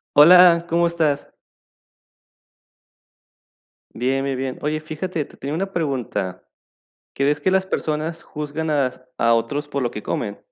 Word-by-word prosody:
Hola, 170 +2 +8
¿cómo 170 0 +2
estás? 155 -4 -1 2.6
Bien, 130 +3 0
bien, 135 -1 -2
bien. 130 0 -3
Oye, 155 +1 -1
fíjate, 155 +1 -4
te - - -18
tenía 140 +2 -5
una 195 +4 -3
pregunta, 120 - -2 0.7
¿crees 145 +2 +1
que 170 - +1
las 190 0 +2
personas 160 -1 -2
juzgan 150 +1 -5
as 135 -4 0 0.2
a 115 - +3
otros 130 +6 -1
por 140 -2 -3
lo 120 - 0
que 105 - -7
comen? 100 -2 -3
150 Hz, 135 wpm, -22 LUFS, 135-165 Hz, 2.6 s, Hola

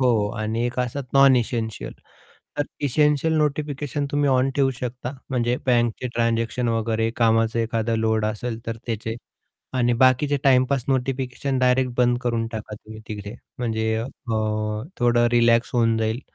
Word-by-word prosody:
हो, 130 - +3
हो 110 -4 +2
आणि 110 +2 -1
एक 120 - -5
असतात 125 +3 -2
नॉन 135 -1 +7
इसेंशियल. 115 -2 -2 0.7
तर - - +3 0.2
इसेंशियल 150 +3 +2
नोटिफिकेशन 145 -1 -1
तुम्ही 145 -1 +1
ऑन 130 +1 +2
ठेऊ 135 -1 +3
शकता, 125 0 -5 0.2
म्हणजे 125 -1 +1
बँकचे 120 0 +1
ट्रान्झॅक्शन 115 +1 0
वगैरे, 115 0 0
कामाचा 115 0 +2
एखादा 115 0 -1
लोड 110 -1 +1
असेल 110 +2 -3
तर 115 0 -3
त्याचे. 110 -1 -3 0.6
आणि 120 -1 +2
बाकीचे 130 +3 +4
टाईमपास 130 -1 +3
नोटिफिकेशन 130 0 -1
डायरेक्ट 125 0 +2
बंद 120 -1 +3
करून 115 -2 0
टाका 110 -1 -6
तुम्ही 110 +1 -12
तिकडे, 105 0 -6 0.2
म्हणजे 110 -2 -1
अ, 110 - -2 0.9
थोडं 120 -1 +3
रिलॅक्स 115 0 +3
होऊन 115 -1 +3
जाईल. 110 +3 -1
120 Hz, 145 wpm, -23 LUFS, 115-130 Hz, 0.9 s, नॉन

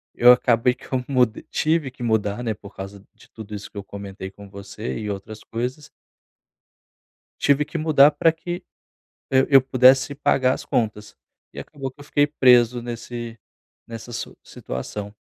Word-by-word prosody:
eu 125 +1 +8
acabei 125 0 +3
que - - -16
eu 125 - 0
mud 125 -5 +1
tive 155 -3 0
que 125 - -16
mudar 110 -2 0
né, 115 -3 -1
por 100 -1 -14
causa 95 +1 -9
de - - -21
tudo 110 -2 -10
isso 100 -1 -7
que - - -14
eu 100 - -5
comentei 100 -1 -8
com 100 0 -14
você 100 +3 -7
e 105 -1 -4
outras 105 +2 -7
coisas 125 +6 -5 1.5
tive 140 +1 +3
que 150 +3 -6
mudar 150 -2 +5
pra 160 +2 +3
que, 175 +2 -6 0.7
hã, 130 0 +5
eu 135 -2 +7
pudesse 130 +1 +4
pagar 130 -2 +2
as - - -8
contas 105 -2 -2 0.4
e - - -11
acabou 135 -2 -6
que 135 +3 -22
eu - - -10
fiquei 145 0 +2
preso 125 -4 +4
nesse 120 -1 -7 0.5
nessa 115 +1 -9
su - - -6
situação. 100 +11 -7
120 Hz, 170 wpm, -23 LUFS, 105-135 Hz, 1.5 s, eu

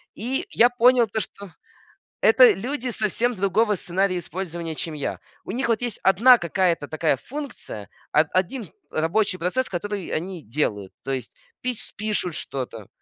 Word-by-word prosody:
И 250 +5 -2
я 240 +1 +5
понял 245 -1 +5
то, 220 +2 -2
что 200 -5 -7 0.7
это 240 +1 +8
люди 250 +6 -3
совсем 230 +2 0
другого 205 +3 +2
сценария 185 0 0
использования, 170 -2 -5
чем 160 +1 -4
я. 145 - -3 0.2
У - - -6
них 250 +3 -1
вот 230 0 +1
есть 240 -4 -3
одна 235 +7 +7
какая-то 170 -3 0
такая 155 -3 +1
функция, 250 - -7 0.2
о - - +5
один 185 - -1 0.2
рабочий 185 +5 +1
процесс, 185 +10 0
который 195 +1 -3
они 175 +1 -3
делают, 105 -6 -2
то 135 - -3
есть 130 -3 -4 0.3
пич 250 -3 -4
пишут 205 -5 0
что-то. 120 -6 -5
195 Hz, 150 wpm, -24 LUFS, 165-230 Hz, 0.7 s, это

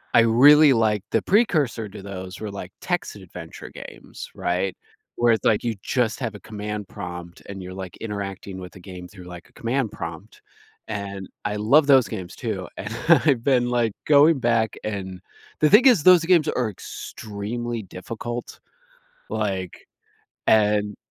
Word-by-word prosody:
I - - +8
really, 140 +6 +7
like, 110 -3 +1
the - - +2
precursor 150 - +2
to 100 0 -10
those 95 -2 -7
were, 105 -2 -4
like, 95 -2 -7
text 175 -10 -2
adventure 90 -4 -10
games, - - -10
right, 90 +2 -1 0.4
where 120 -1 +4
it's, 110 - -2
like, 110 - +3
you 115 -2 0
just 120 -3 0
have 115 -4 -3
a - - -9
command 105 -1 -6
prompt 90 -3 -8
and 95 -2 -7
you're, 90 0 -8
like, 95 -2 -8
interacting 100 -3 -6
with 90 -1 -9
the 95 - -13
game 90 -1 -10
through, 95 -2 -13
like, 90 -1 -11
a - - -30
command 120 0 -1
prompt. 85 +5 -8 0.5
And 100 -2 -5 0.2
I 105 0 -1
love 140 +8 +4
those 135 -4 +6
games 95 -5 -6
too, - - -4
and - - -5 0.2
I've 135 -6 +5
been, 125 -3 +2
like, 120 -4 +1
going 150 +1 +6
back 115 -3 +1
and 95 -3 -5 0.4
the 150 - +5
thing 230 +6 +7
is 215 - +5
those 180 -2 +7
games 170 -4 +4
are 125 -4 0
extremely 110 +4 -6
difficult, 115 +6 -7 0.7
like, 100 -4 -3 0.6
and 105 -1 +3
105 Hz, 160 wpm, -23 LUFS, 95-120 Hz, 0.7 s, I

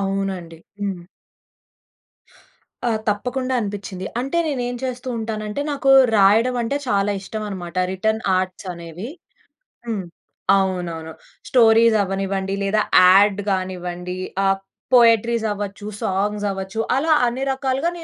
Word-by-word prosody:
అవునండి. 195 -4 -3 0.2
హ్మ్. 195 -3 -3 1.9
ఆ! - - +1 0.2
తప్పకుండా 255 +5 -1
అనిపించింది. 195 -3 -5
అంటే 275 +6 -3
నేను 280 -5 -1
ఏమి 245 0 -4
చేస్తూంటానంటే, 230 -3 -4
నాకు 275 -1 +1 0.3
రాయడమంటే 230 +6 +3
చాలా 200 -1 +2
ఇష్టమన్నమాట 195 -4 -6 0.2
రిటర్న్ 220 +3 -1 0.2
ఆర్ట్స్ 185 +1 -4
అనేవి. 170 +4 -8 0.8
హ్మ్. 220 -5 -3 0.5
అవునవును. 175 -4 -2 0.4
స్టోరీస్ 230 -2 +5
అవ్వనివ్వండి, 195 0 -2
లేదా 205 +2 +2 0.2
యాడ్ 195 +2 +6
కానివ్వండి. 180 -1 -3 0.3
ఆహ్, 195 0 +2 0.4
పోయెట్రీస్ 230 -1 +4
అవ్వచ్చు, 205 0 -6
సాంగ్స్ 205 0 -1
అవ్వచ్చు, 195 +3 -5 0.2
అలా 315 +3 +3
అన్ని 250 +3 -2
రకాలుగా 265 +4 -1
205 Hz, 105 wpm, -21 LUFS, 190-230 Hz, 1.9 s, యాడ్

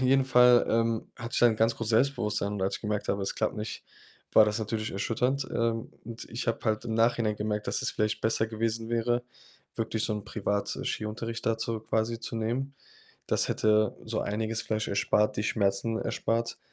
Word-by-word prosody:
jeden 130 +1 +4
Fall, 125 -1 +6
ähm, 115 0 +1
hatte 115 -2 -6
ich - - +2
dann 120 -1 +6
'n 110 - -5
ganz 115 +2 +2
großes 115 -1 -2
Selbstbewusstsein 110 -4 +1
und 95 - -3
als 95 - 0
ich - - -15
gemerkt 105 -1 -2
habe, 100 0 0
es 95 - -2
klappt - - -1
nicht, 105 +1 -5 0.5
war 110 - +8
das 105 +1 -1
natürlich 110 0 -2
erschütternd. 125 +7 0
Ähm, 115 -1 -1
und 115 0 -7
ich 120 +3 -4
habe 115 - +1
halt 110 -2 0
im 110 - -2
Nachhinein 115 -1 +2
gemerkt, 105 0 -2
dass - - -1
es - - 0
vielleicht 105 0 -1
besser 110 0 +1
gewesen 115 +1 -2
wäre, 120 +1 +1 0.5
wirklich 110 0 -1
so - - 0
'n 105 -1 -5
Privat 105 -2 -2
äh, - - -5
Skiunterricht 115 +2 -4
da 115 -1 +2
zu 115 -1 -2
quasi 110 +1 -1
zu 115 - -5
nehmen. 125 +5 -2 0.5
Das - - +1
hätte 110 -1 +2
so - - -2
einiges 110 +2 -2
vielleicht 110 0 -2
erspart 105 +1 +2
die 105 - 0
Schmerzen 105 +2 0
erspart. 115 +1 -1
110 Hz, 200 wpm, -29 LUFS, 105-115 Hz, 0.5 s, war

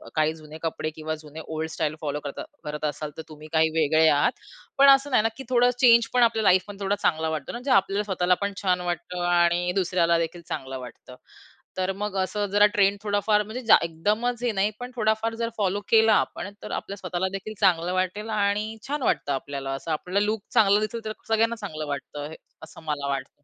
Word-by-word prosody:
काही 155 0 +2
जुने 155 0 -11
कपडे 155 -1 -2
किंवा 155 0 -4
जुने 150 +1 -10
ओल्ड 160 0 -3
स्टाईल 155 0 -2
फॉलो 150 -1 -2
करता 140 - -5 0.2
करत 150 0 -4
असाल, 150 0 -3
तर 160 - -4
तुम्ही 155 0 -11
काही 160 0 +4
वेगळे 155 +1 +4
आहात. 145 +10 +3 0.5
पण 275 0 +7
असं 275 +1 +5
नाही 215 - +4
ना, 225 - +2
की 270 - -7
थोडं 245 -1 +4
चेंज 235 -2 +6
पण 245 -1 +4
आपल्या 225 -1 +2
लाईफ 185 -1 +4
पण 205 -1 -9
थोडा 200 +1 0
चांगला 160 -1 +1
वाटतो 155 -3 -4
ना. - - -7
म्हणजे 260 +2 -3
आपल्याला 195 -1 +3
स्वतःला 185 -3 +1
पण 200 0 -1
छान 180 -2 +1
वाटतं 175 +1 -5
आणि 175 0 +3
दुसऱ्याला 175 -2 +2
देखील 165 +1 -3
चांगलं 130 0 -5
वाटतं. 125 0 -11 0.6
तर 185 +1 0
मग 210 -1 -3
असं 205 +3 -2
जरा 205 +1 +6
ट्रेंड 200 0 +3
थोडाफार 210 +1 +2
म्हणजे 220 +5 -6
जा - - +9
एकदमच 215 +9 -1
हे 240 - +2
नाही 205 +2 +2
पण 245 +1 -7
थोडाफार 220 0 0
जर 230 0 -2
फॉलो 200 -1 0
केला 220 -1 +6
आपण. - - -8
तर - - -7
आपल्या 200 - -4
स्वतःला 185 -1 -2
देखील 195 +2 -5
चांगलं 180 -3 +2
वाटेल 185 +4 -2
आणि 210 +1 0
छान 290 0 -2
वाटतं 145 - 0
आपल्याला. 135 0 -4
असं 150 +4 -6
आपल्याला 180 +6 0
लूक 215 -1 -2
चांगला 205 -4 +5
दिसेल. 215 +2 -3
तर 215 - -3
सगळ्यांना 225 +1 +2
चांगलं 155 -9 -6
वाटतं, 145 +1 -5 0.3
असं - - -12
मला 145 -2 -3
वाटतं. 140 +1 -5
190 Hz, 205 wpm, -25 LUFS, 160-215 Hz, 0.6 s, जा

